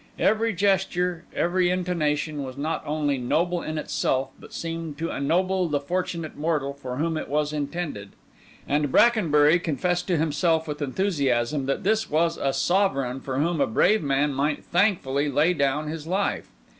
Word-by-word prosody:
Every 225 +1 +2
gesture, 180 -3 0
every 180 +1 +2
intonation, 155 -5 -1
was 130 -1 -7
not 155 +3 -2
only 145 -2 0
noble 170 +8 0
in 155 0 -4
itself, 135 -3 -1
but - - -14
seemed 165 -2 -5
to 165 +1 -3
ennoble 180 +5 +1
the 145 -2 0
fortunate 170 +1 -3
mortal 150 -3 -1
for 130 -3 -6
whom 160 +3 -1
it - - -4
was 150 +1 0
intended; 145 - -4 0.5
and 145 -1 +1
Brackenbury 170 - +4
confessed 175 +2 -1
to 180 -3 +1
himself 160 +1 +1
with 150 0 -5
enthusiasm 140 -4 0
that 135 - -1
this 220 +2 +1
was 165 +2 +1
a 135 - 0
sovereign 135 -9 +1
for 130 -1 -4
whom 160 +1 +1
a - - +3
brave 210 - +3
man 140 0 +1
might 145 +2 -1
thankfully 170 -7 +1
lay 150 +6 +3
down 145 -1 0
his 155 0 -6
life. 190 +3 -1
155 Hz, 160 wpm, -25 LUFS, 140-175 Hz, 0.5 s, Brackenbury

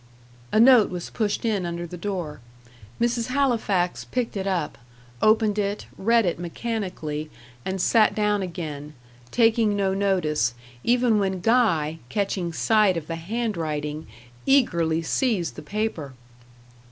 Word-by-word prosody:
A - - +3
note 240 -2 +7
was 180 -1 -6
pushed 215 -1 -1
in 210 -4 0
under 170 0 -4
the 175 - -8
door. 175 -6 -4 0.6
Mrs. 235 -1 0
Halifax 230 -9 0
picked 250 -3 -3
it 195 -1 -2
up 175 -9 -2 0.4
opened 215 -1 +3
it, 205 0 -2
read 230 +2 +3
it 175 -2 -1
mechanically, 175 -5 -4 0.3
and 190 0 -3
sat 215 +3 +4
down 210 -1 +1
again; 150 -5 -6 0.3
taking 225 - +3
no 195 -1 +1
notice, 180 -10 +1 0.3
even 240 -2 +3
when 190 -2 -1
Guy, 170 -8 +2
catching 195 -4 -1
sight 210 +1 +3
of 160 - -4
the 165 - -4
hand 215 +6 -3
writing, 150 -1 -3 0.4
eagerly 170 - +3
seized 210 - 0
the - - -8
paper. 205 -10 -3
195 Hz, 135 wpm, -24 LUFS, 170-225 Hz, 0.6 s, note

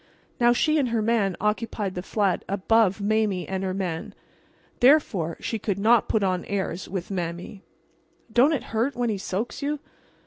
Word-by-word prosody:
Now 240 0 +5
she 305 +5 +2
and 260 -4 +1
her 230 -1 0
man 210 -5 +1
occupied 210 -2 -1
the 180 - -4
flat 195 0 0
above 200 +1 +2
Mame 205 -3 +1
and 190 0 -3
her 190 - -1
man. 180 -4 -4 0.6
Therefore 245 - +3
she 225 - -3
could 200 -2 -2
not 225 +3 +3
put 215 - +2
on 185 -2 0
airs 190 -3 -3
with 185 0 -4
Mame. 175 +1 -4 0.7
"Don't 255 +6 +5
it 290 - -1
hurt 235 +6 0
when 240 -1 0
he 200 - -3
soaks 200 +8 -4
you?" 295 +1 -1
205 Hz, 170 wpm, -25 LUFS, 190-235 Hz, 0.7 s, Now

